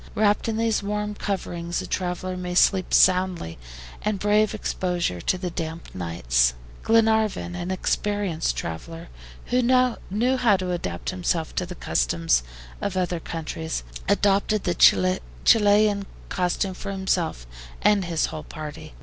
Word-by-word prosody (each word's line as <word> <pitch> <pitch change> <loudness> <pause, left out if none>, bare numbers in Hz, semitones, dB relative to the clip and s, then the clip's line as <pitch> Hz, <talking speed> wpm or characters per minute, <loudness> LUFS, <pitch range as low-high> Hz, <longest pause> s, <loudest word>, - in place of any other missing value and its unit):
Wrapped 210 +1 +2
in 220 - -1
these 225 -1 +1
warm 210 +1 -2
coverings 175 -4 -3
a - - -4
traveler 185 0 -3
may 180 -1 -4
sleep 185 0 +3
soundly, 180 - +3 0.4
and 210 -1 -1
brave 210 +2 +2
exposure 175 - -2
to 185 - 0
the 180 -1 -4
damp 165 0 -6
nights. 60 -9 +1 0.3
Glenarvan, 220 -5 +2
an 175 0 -4
experienced 190 -2 -1
traveler, 165 - -6 0.4
who 250 +1 +3
knew 250 -1 +2
how 230 -6 +4
to 185 -1 -3
adapt 90 - -3
himself 175 -3 -1
to 180 - -2
the 180 - -7
customs 80 - +1 0.4
of 190 -2 -2
other 180 -2 0
countries, 160 0 -4 0.3
adopted 200 +1 +2
the 175 - +1 0.7
Chilian 205 -2 +4 0.2
costume 185 +1 -1
for 200 +2 -6
himself 185 - -1 0.4
and 200 -3 +4
his 170 -2 0
whole 155 - -6
party. 150 - -8
185 Hz, 135 wpm, -24 LUFS, 165-205 Hz, 0.7 s, how